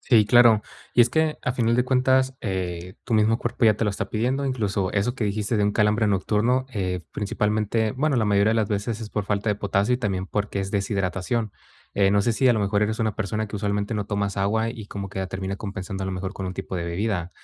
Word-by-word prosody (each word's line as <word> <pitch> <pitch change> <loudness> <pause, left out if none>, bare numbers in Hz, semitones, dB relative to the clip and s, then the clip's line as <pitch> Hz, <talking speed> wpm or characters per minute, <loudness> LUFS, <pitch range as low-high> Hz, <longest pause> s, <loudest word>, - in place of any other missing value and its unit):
Sí, 110 -5 +4
claro. 115 -2 +6 0.3
Y - - +4
es 120 - +6
que, 160 +1 +1
a 125 - 0
final 115 -2 +1
de 125 - +2
cuentas, 130 0 +2
eh, 90 -3 -4
tu 120 - -1
mismo 110 +1 +3
cuerpo 120 +1 -1
ya 110 -2 +6
te 115 - 0
lo 105 - +1
está 100 - -4
pidiendo, 125 +6 0
incluso 105 -8 -1
eso 105 +4 0
que 120 -5 -2
dijiste 105 +2 -1
de 105 - +2
un 105 - +1
calambre 105 +1 +2
nocturno, 105 +6 +1
eh, 90 -4 -2
principalmente 105 +1 0
bueno, 140 +1 0
la 110 - +2
mayoría 100 +1 +3
de - - +1
las 110 -3 +1
veces 105 +2 -2
es 110 - -6
por 105 -2 -2
falta 105 +1 -1
de 105 - +2
potasio 100 +3 +1
y - - +1
también 95 -5 -2
porque 100 0 -2
es 95 0 -4
deshidratación. 100 +2 -1 0.4
Eh, 100 -1 +4
no 100 0 +3
sé 120 - +1
si 130 +3 +3
a - - +6
lo 110 - 0
mejor, 100 +1 +1
eres 110 +1 0
una 110 -2 0
persona 110 +2 -2
que 100 - -9
usualmente 100 +1 -1
no 105 -1 -1
tomas 100 -1 -2
agua 110 +3 +1
y 115 -3 -7
como 100 -2 -6
que 95 0 -4
termina 95 +1 -4
compensando 95 -1 -5
a - - -2
lo 95 - -2
mejor 95 +2 -4
con 95 - -5
un 90 - -3
tipo 95 0 -6
de 85 - -3
bebida. 90 0 -2
105 Hz, 250 wpm, -24 LUFS, 100-115 Hz, 0.4 s, claro